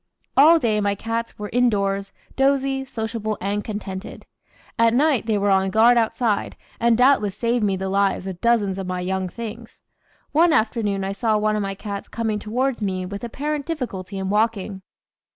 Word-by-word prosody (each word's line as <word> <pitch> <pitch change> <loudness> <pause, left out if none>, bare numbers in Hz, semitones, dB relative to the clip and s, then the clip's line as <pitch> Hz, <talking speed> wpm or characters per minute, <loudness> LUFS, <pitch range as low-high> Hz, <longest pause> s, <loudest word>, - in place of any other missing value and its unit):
All 315 +5 +7
day 220 -8 +1
my 200 0 +1
cats 230 +2 -4
were 210 -1 -6
indoors, 200 -5 +1 0.2
dozy, 270 0 +1
sociable, 220 -3 -4
and 200 +2 -2
contented. 205 -2 -6 0.5
At 230 0 +4
night 275 -4 +2
they 215 -2 +2
were 200 0 +1
on 190 0 +3
guard 225 +4 +5
outside, 225 -2 0 0.2
and 235 -1 +3
doubtless 250 -6 +3
saved 235 -1 0
me 195 -2 +2
the 190 +1 -3
lives 195 -1 +1
of 185 -2 -6
dozens 210 -5 +2
of 190 - -4
my 180 0 -3
"young 190 0 -2
things." 230 +2 -8 0.5
One 325 +2 +4
afternoon 215 -6 +1
I 195 - -2
saw 215 +2 +1
one 215 0 +1
of 210 - 0
my 195 -1 -3
cats 200 0 -6
coming 220 -2 -2
towards 245 +4 -1
me 185 -2 -2
with 200 +3 -7
apparent 290 +5 -3
difficulty 205 - -4
in 190 0 -2
walking. 210 -2 0
215 Hz, 175 wpm, -22 LUFS, 195-235 Hz, 0.5 s, All